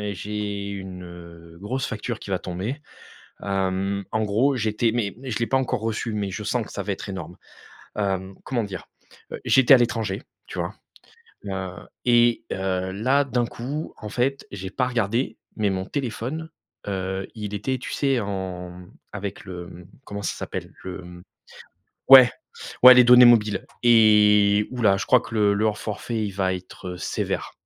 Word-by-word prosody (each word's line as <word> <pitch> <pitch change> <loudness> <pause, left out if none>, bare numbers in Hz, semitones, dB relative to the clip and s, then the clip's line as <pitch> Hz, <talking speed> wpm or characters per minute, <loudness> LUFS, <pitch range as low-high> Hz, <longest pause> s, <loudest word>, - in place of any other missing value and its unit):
j'ai 100 0 -4
une, 95 -2 -7
heu, 85 -1 -12
grosse 130 +7 -3
facture 110 0 -4
qui 100 - -8
va 95 - 0
tomber, 100 - -5 0.6
hem, 95 0 -1
en 110 0 0
gros 125 +7 +2
j'étais 110 0 0
mais 110 -5 -1
mais 130 +1 -7
je 110 - -2
l'ai 115 - 0
pas 135 - +2
encore 125 -3 -1
reçu. 110 0 -2
Mais 100 -2 -2
je 105 +3 -5
sens 115 +2 -1
que - - -12
ça 100 - -4
va 100 - -3
être 100 - -5
énorme, 90 -2 -7 0.6
hem, 95 -2 -2
comment 120 -3 -1
dire? 100 -3 -7 0.5
Heu, - - -6
j'étais 135 +1 +6
à 130 - +9
l'étranger, 115 -4 -1 0.2
tu - - -7
vois? - - -3 0.7
Heu 95 -2 -4 0.3
et 120 -1 +4
heu, 95 -1 -2
là 130 +7 +2
d'un 125 -2 0
coup 135 +7 -5
en 105 - -7
fait 135 +4 -1
j'ai 95 -1 -6
pas 125 +6 -1
regardé 120 0 -1 0.2
mais 105 -2 +1
mon 95 -1 -2
téléphone, 140 +6 -4 0.4
heu, 95 -1 -3
il 105 -2 -6
était, 130 +6 -2
tu - - -7
sais, 135 -4 +1
en 90 -3 -5 0.3
avec 100 -1 -6
le 90 -2 -9 0.2
comment 100 0 -6
ça 95 - -2
s'appelle? - - -6
Le 95 0 -6
mmh 90 0 -12 0.9
ouais 130 -2 +10 0.5
ouais, 125 +1 +12
les 125 - +8
données 125 +1 +9
mobiles 110 -4 +4 0.2
et 105 -3 +5
ouh-la! 115 -6 +2
Je - - -4
crois 125 - +5
que 115 - -10
le 105 -2 +3
le 105 +1 +2
forfait 110 +2 -4
il 100 - -4
va 95 -1 0
être, 90 0 -9
heu, 90 - -6
sévère. - - -3
105 Hz, 175 wpm, -24 LUFS, 95-120 Hz, 0.9 s, ouais